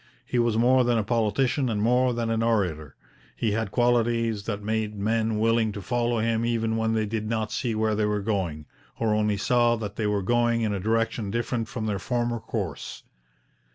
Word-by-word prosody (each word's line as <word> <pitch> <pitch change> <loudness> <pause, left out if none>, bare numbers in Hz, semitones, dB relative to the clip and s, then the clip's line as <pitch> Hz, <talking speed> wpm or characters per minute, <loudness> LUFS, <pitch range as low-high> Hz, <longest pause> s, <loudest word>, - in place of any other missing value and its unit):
He 125 - -1
was 120 -2 +2
more 125 +2 +4
than 120 -1 +2
a 110 - +1
politician 120 +4 +1
and 110 -2 -1
more 125 +4 +3
than 115 -1 -2
an 115 0 0
orator. 90 -11 0 0.4
He 115 - 0
had 110 0 -1
qualities 115 -2 +1
that 105 -2 -4
made 110 0 -1
men 110 +1 0
willing 115 0 +2
to 100 - -6
follow 120 +1 0
him 115 0 0
even 115 -1 0
when 110 0 0
they 110 -1 +1
did 110 0 -3
not 110 -2 -1
see 120 -4 -1
where 110 0 +1
they 105 0 +1
were 105 -1 -1
going, 90 -8 -2 0.3
or 110 -2 +1
only 105 -1 +1
saw 120 +3 +3
that 105 -2 -6
they 110 - 0
were 105 -1 0
going 120 +2 +2
in 105 -2 0
a 100 - -2
direction 110 +1 0
different 115 +1 -2
from 115 -4 -4
their 105 -2 -1
former 120 +1 -1
course. 110 - -5
110 Hz, 200 wpm, -26 LUFS, 105-120 Hz, 0.4 s, more